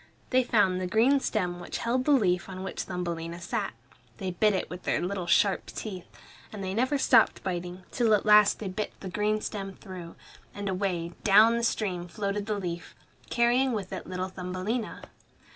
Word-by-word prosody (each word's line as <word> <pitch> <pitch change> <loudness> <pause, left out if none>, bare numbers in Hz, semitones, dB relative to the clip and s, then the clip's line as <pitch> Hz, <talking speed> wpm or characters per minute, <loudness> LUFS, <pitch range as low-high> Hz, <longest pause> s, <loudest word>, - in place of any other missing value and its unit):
They 255 0 +4
found 200 -6 +2
the 185 - -1
green 235 +8 +4
stem 180 -8 -1
which 175 - -5
held 250 +2 0
the 295 - +3
leaf 185 -10 +2
on 185 0 -6
which 190 - -4
Thumbelina 170 -2 -4
sat. 200 +3 -3 0.4
They 185 - -3
bit 210 +3 +2
it 185 - -2
with 180 0 -8
their - - 0
little 180 +1 -3
sharp 190 +4 +3
teeth, 190 -5 -6 0.4
and 205 -2 -6
they 190 0 -3
never 255 +7 +1
stopped 265 - +4
biting, 180 0 -4
till 230 -4 +3
at 205 - -2
last 210 -1 +6
they 210 - -5
bit 195 +3 -3
the 190 - -5
green 210 +3 0
stem 195 -3 -5
through; 180 -4 -9 0.4
and 205 0 -4
away, 185 -3 -1
down 215 +3 +6
the 235 - -1
stream, 185 -6 -1
floated 200 +2 -3
the 210 -1 -1
leaf, 175 -3 -5 0.3
carrying 245 +2 +3
with 200 -4 -4
it - - -6
little 185 0 -3
Thumbelina. 185 +5 -4
195 Hz, 185 wpm, -28 LUFS, 180-215 Hz, 0.4 s, last